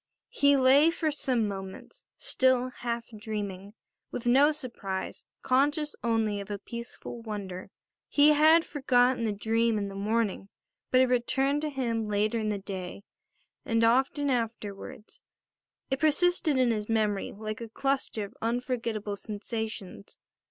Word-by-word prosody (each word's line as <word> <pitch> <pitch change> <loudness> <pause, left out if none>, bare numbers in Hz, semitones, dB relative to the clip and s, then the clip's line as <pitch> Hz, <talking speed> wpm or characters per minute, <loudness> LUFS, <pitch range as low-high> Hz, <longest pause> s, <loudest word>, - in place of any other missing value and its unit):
He 285 0 +4
lay 270 +4 +6
for 325 -2 -1
some 255 -6 0
moments 195 -1 -8
still 255 -1 +2
half 235 -1 -4
dreaming, 205 -2 -5 0.3
with 245 - -6
no 275 +5 +5
surprise, 235 -10 -5 0.2
conscious 290 +3 +1
only 225 -3 +1
of 200 - -10
a 205 - -3
peaceful 235 +2 -8
wonder. 195 -4 -6 0.4
He 290 +1 +5
had 315 +2 +6
forgotten 250 -4 +2
the 215 - +1
dream 225 +2 +1
in 200 -1 -2
the - - -8
morning; 205 -1 -1 0.4
but 255 - +5
it - - +6
returned 265 +3 +1
to 305 - -1
him 235 -6 -2
later 210 +2 +1
in 215 -1 -1
the 210 - -1
day, 195 -1 -7 0.6
and 230 0 +1
often 270 +4 +2
afterwards. 220 -3 -4 0.7
It 270 - 0
persisted 315 -1 +2
in 255 -2 +3
his 210 -1 -3
memory 215 -3 0
like 215 +2 -6
a 230 - -6
cluster 270 -3 -1
of 200 - -13
unforgettable 230 -3 -2
sensations. 215 - -6
230 Hz, 140 wpm, -28 LUFS, 210-265 Hz, 0.7 s, lay